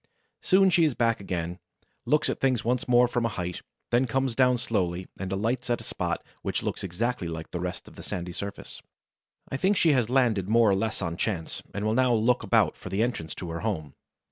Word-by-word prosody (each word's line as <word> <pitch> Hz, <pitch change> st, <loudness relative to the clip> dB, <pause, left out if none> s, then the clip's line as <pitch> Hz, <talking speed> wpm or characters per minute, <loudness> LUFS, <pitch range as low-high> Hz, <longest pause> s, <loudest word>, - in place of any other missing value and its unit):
Soon 190 Hz, 0 st, +4 dB
she 175 Hz, -1 st, +4 dB
is 150 Hz, -6 st, +2 dB
back 115 Hz, -1 st, +2 dB
again, 90 Hz, -2 st, -3 dB, 0.5 s
looks 150 Hz, 0 st, +3 dB
at -, -, -1 dB
things 130 Hz, -4 st, +1 dB
once 125 Hz, +1 st, 0 dB
more 125 Hz, 0 st, +5 dB
from 120 Hz, 0 st, -1 dB
a 115 Hz, -, +1 dB
height, 90 Hz, -1 st, -3 dB, 0.3 s
then 125 Hz, +2 st, +3 dB
comes 130 Hz, +1 st, 0 dB
down 125 Hz, 0 st, +4 dB
slowly 95 Hz, -6 st, -1 dB
and 95 Hz, 0 st, -4 dB
alights 115 Hz, +6 st, -1 dB
at 120 Hz, -, +1 dB
a -, -, -9 dB
spot -, -, -3 dB, 0.2 s
which -, -, -2 dB
looks -, -, -3 dB
exactly 100 Hz, +2 st, -2 dB
like 80 Hz, -1 st, -6 dB
the 90 Hz, -, -3 dB
rest 90 Hz, +1 st, -5 dB
of -, -, -15 dB
the -, -, -8 dB
sandy 90 Hz, 0 st, -4 dB
surface. 100 Hz, +3 st, -7 dB, 0.7 s
I 135 Hz, -, -2 dB
think 190 Hz, +7 st, +2 dB
she 160 Hz, -3 st, +5 dB
has 120 Hz, -4 st, +1 dB
landed 115 Hz, -7 st, +2 dB
more 115 Hz, -1 st, +5 dB
or -, -, +3 dB
less 110 Hz, 0 st, -2 dB
on 85 Hz, -1 st, -3 dB
chance, 90 Hz, -7 st, -2 dB
and 100 Hz, +1 st, -3 dB
will 110 Hz, -, +2 dB
now 125 Hz, 0 st, +3 dB
look 115 Hz, +3 st, +2 dB
about -, -, +3 dB
for -, -, -9 dB
the 100 Hz, +4 st, +1 dB
entrance 85 Hz, -10 st, -3 dB
to 85 Hz, -3 st, -6 dB
her 85 Hz, -, -4 dB
home. 90 Hz, -9 st, -3 dB
115 Hz, 220 wpm, -27 LUFS, 90-125 Hz, 0.7 s, more